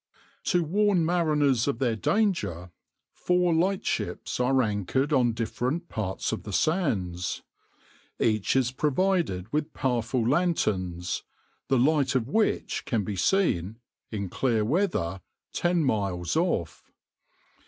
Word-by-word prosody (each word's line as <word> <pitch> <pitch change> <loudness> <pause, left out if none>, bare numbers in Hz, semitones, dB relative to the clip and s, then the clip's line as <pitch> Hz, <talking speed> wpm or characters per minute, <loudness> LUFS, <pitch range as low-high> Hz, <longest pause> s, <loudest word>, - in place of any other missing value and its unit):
To 175 -1 +2
warn 190 +1 +2
mariners 150 -7 +2
of 140 - 0
their 120 -3 0
danger, 110 - 0 0.4
four 180 -1 +1
lightships 185 -3 -1
are 130 +2 +3
anchored 110 - -1
on 125 -4 +3
different 125 +8 -2
parts 95 -3 -3
of 110 - -3
the 105 - -8
sands. 95 - -1 0.8
Each 110 0 +1
is 130 -2 +2
provided 150 - 0
with 150 0 -1
powerful 120 -2 0
lanterns, 100 - 0 0.5
the 135 - +2
light 140 0 +2
of 120 -3 +1
which 220 +9 0
can 115 -4 0
be 100 +1 -4
seen, 105 - +1 0.3
in 100 -3 -3
clear 110 +2 0
weather, 110 - 0 0.3
ten 175 -1 +1
miles 100 - -1
off. 160 - -1
130 Hz, 120 wpm, -27 LUFS, 105-170 Hz, 0.8 s, are